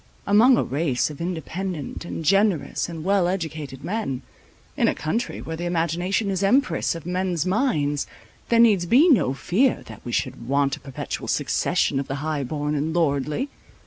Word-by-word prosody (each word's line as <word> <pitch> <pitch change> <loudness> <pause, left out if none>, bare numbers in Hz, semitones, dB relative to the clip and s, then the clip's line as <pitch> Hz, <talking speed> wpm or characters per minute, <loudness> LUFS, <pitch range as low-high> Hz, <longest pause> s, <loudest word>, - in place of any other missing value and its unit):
Among 235 +5 +6
a - - +2
race 140 0 0
of 150 - -9
independent, 175 -2 -4
and 165 - -5
generous, 195 -2 +2
and 165 -2 -6
well 195 -1 +2
educated 155 -7 -4
men, 180 - -3 0.5
in - - +2
a - - +1
country 225 +11 -3
where 160 - -5
the 175 +2 -4
imagination 175 +4 0
is 190 -1 -1
empress 200 -5 +2
of 165 - -8
men's 180 -2 -1
minds, 160 - 0 0.4
there 235 - +4
needs 210 -7 +5
be 270 - +6
no 170 - +3
fear 235 - +1
that - - -11
we 120 - -5
should 120 -1 -2
want 140 +1 +2
a - - -14
perpetual 135 -2 -6
succession 135 - +1
of 135 - -4
the 135 - -3
high 155 -3 -1
born 150 +3 -2
and 155 +3 -1
lordly. 150 - 0
170 Hz, 175 wpm, -24 LUFS, 145-195 Hz, 0.5 s, Among